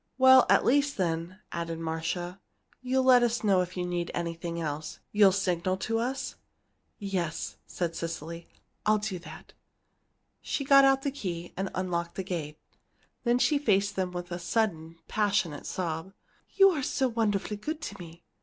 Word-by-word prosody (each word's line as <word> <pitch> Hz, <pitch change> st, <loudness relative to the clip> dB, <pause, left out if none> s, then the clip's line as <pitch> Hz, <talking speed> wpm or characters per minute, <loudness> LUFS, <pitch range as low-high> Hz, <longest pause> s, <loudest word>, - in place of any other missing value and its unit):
"At 260 Hz, 0 st, +7 dB
least, 285 Hz, +2 st, +2 dB
then," 170 Hz, 0 st, -2 dB
added 165 Hz, -1 st, -3 dB
Marcia, 165 Hz, +3 st, -3 dB, 0.4 s
"you'll 260 Hz, +1 st, +1 dB
let 255 Hz, -1 st, +7 dB
us 240 Hz, 0 st, +1 dB
know 195 Hz, -3 st, +4 dB
if 180 Hz, +1 st, -5 dB
you 180 Hz, -, -1 dB
need 175 Hz, -1 st, -2 dB
anything 170 Hz, 0 st, -3 dB
else 155 Hz, -1 st, -4 dB
you'll 205 Hz, -2 st, +6 dB
signal 185 Hz, -1 st, 0 dB
to 225 Hz, +4 st, -1 dB
us?" 260 Hz, +3 st, -3 dB, 0.6 s
"Yes," 185 Hz, -5 st, -3 dB
said 170 Hz, -2 st, -3 dB
Cecily, 165 Hz, 0 st, -5 dB, 0.4 s
"I'll 215 Hz, 0 st, +4 dB
do 205 Hz, -3 st, -3 dB
that." 170 Hz, -, -12 dB, 0.9 s
She 280 Hz, -, -2 dB
got 275 Hz, 0 st, +7 dB
out 270 Hz, 0 st, +3 dB
the 280 Hz, -, 0 dB
key, 175 Hz, -10 st, -5 dB
and 190 Hz, 0 st, -2 dB
unlocked 175 Hz, -2 st, -2 dB
the 190 Hz, -, -3 dB
gate. 160 Hz, -5 st, -4 dB, 0.7 s
Then 240 Hz, +1 st, +4 dB
she 290 Hz, +3 st, +3 dB
faced 205 Hz, -6 st, +2 dB
them 185 Hz, -1 st, -1 dB
with 175 Hz, 0 st, -6 dB
a 175 Hz, -, -3 dB
sudden, 170 Hz, -4 st, -1 dB
passionate 200 Hz, -8 st, 0 dB
sob. 170 Hz, +1 st, -3 dB, 0.4 s
"You 390 Hz, -1 st, +7 dB
are 310 Hz, -5 st, -2 dB
so 265 Hz, 0 st, 0 dB
wonderfully 215 Hz, -3 st, -1 dB
good 300 Hz, +9 st, -4 dB
to 205 Hz, -9 st, -6 dB
me! 170 Hz, -1 st, -11 dB
185 Hz, 160 wpm, -28 LUFS, 170-230 Hz, 0.9 s, At